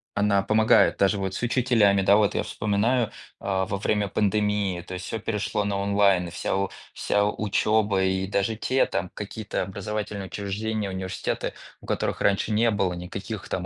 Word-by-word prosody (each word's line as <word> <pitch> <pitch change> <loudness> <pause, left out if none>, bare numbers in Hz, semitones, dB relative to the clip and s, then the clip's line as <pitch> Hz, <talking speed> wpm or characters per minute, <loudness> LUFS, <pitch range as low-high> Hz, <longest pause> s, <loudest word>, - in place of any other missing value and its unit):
она 100 -1 +2
помогает 110 +1 +4
даже, 100 +1 +3
вот, 95 -1 -3
с - - -4
учителями, 115 -5 +3
да, 100 +2 +5
вот. 105 -2 +2
Я - - +1
вспоминаю, 105 +3 0 0.3
а 95 -1 -1
во 100 +1 -3
время 105 0 0
пандемии, 105 -3 0
то 95 - -9
есть, 90 +1 -5
всё 115 - -4
перешло 105 -1 -1
на 100 -1 -1
онлайн, 100 -3 +2
вся 95 +3 -1 0.3
вся 105 - +1
учёба 105 -1 +1
и 95 0 0
даже 100 +3 0
те, 130 +4 +2
там, 95 -2 -3
какие-то 105 0 -4
образовательные 105 0 -4
учреждения, 105 +2 -3
университеты, 95 0 -3 0.3
у - - -15
которых - - -1
раньше 100 +2 +2
не 115 +2 +3
было 100 -4 +1
никаких, 95 +4 -6
там, 90 -1 -2
100 Hz, 165 wpm, -25 LUFS, 95-105 Hz, 0.3 s, да